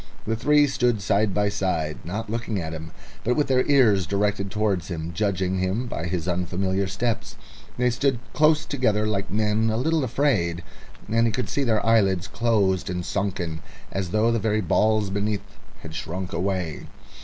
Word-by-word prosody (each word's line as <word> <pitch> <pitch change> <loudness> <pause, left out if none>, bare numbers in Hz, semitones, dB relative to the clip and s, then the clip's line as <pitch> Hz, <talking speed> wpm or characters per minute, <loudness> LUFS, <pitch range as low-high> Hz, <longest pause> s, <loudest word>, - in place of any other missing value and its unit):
The 110 - 0
three 150 +6 +4
stood 125 -5 +1
side 100 +1 +1
by 105 +1 +1
side, 80 -6 -1
not 105 +7 -4
looking 110 -2 -2
at 80 -2 -4
him, 80 0 -7 0.3
but 125 +2 +1
with 150 - +2
their 130 -2 +3
ears 110 - +4
directed 100 0 0
towards 100 -4 0
him, 85 -2 -4
judging 95 -1 0
him 95 +7 -1
by 90 -8 -4
his 90 -1 -2
unfamiliar 95 +2 0
steps. 110 +4 -2 0.4
They 125 0 +2
stood 130 +2 +1 0.2
close 155 0 +3
together 110 -8 +1
like 100 -2 -1
men 110 +1 +1
a 110 - 0
little 160 +4 +1
afraid, 110 - +1 0.4
and 115 +2 +2
he - - +1
could 125 0 -2
see 140 - 0
their 115 -4 +1
eyelids 100 -5 +3
closed 100 -5 +1
and 90 -1 -3
sunken, 90 -5 -2 0.3
as 95 -2 -2
though 110 +5 +2
the 115 - +1
very 110 0 +1
balls 105 +2 +2
beneath 100 0 -1 0.4
had 80 - -9
shrunk 90 +4 -5
away. 90 -4 -2
105 Hz, 175 wpm, -24 LUFS, 95-115 Hz, 0.4 s, three